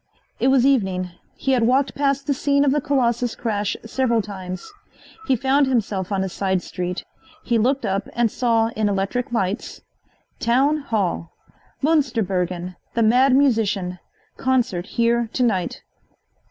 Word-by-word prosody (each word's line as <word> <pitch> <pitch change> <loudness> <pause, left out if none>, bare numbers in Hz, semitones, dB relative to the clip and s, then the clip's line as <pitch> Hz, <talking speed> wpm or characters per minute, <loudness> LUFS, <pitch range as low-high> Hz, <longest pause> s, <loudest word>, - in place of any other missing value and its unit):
It - - +2
was 265 -1 +4
evening. 190 -9 +1 0.2
He 270 - -1
had 255 -2 +3
walked 260 +4 +2
past 275 -1 0
the 285 - +1
scene 280 +1 +2
of 275 - +3
the 295 +1 +1
Colossus 245 -4 0
crash 210 -3 -2
several 235 0 +1
times. 190 - -7 0.5
He 265 - +4
found 270 +3 +2
himself 210 -7 -1
on 195 -1 0
a - - -1
side 190 -1 -1
street. 180 0 -4 0.4
He 235 -2 +1
looked 265 +5 +1
up 195 +1 -2
and 235 -2 +1
saw 230 -2 +2
in 215 -2 -1
electric 200 +5 -1
lights: 200 -2 -2 0.6
TOWN 265 +6 +3
HALL 200 - -2 0.5
Munsterbergen, 185 - 0 0.2
the 230 - +3
Mad 255 +4 +5
Musician 215 -9 +1 0.4
Concert 245 -9 0
Here 235 -1 +1
To 255 - +1
night. 190 -7 -1
230 Hz, 145 wpm, -22 LUFS, 195-265 Hz, 0.6 s, Mad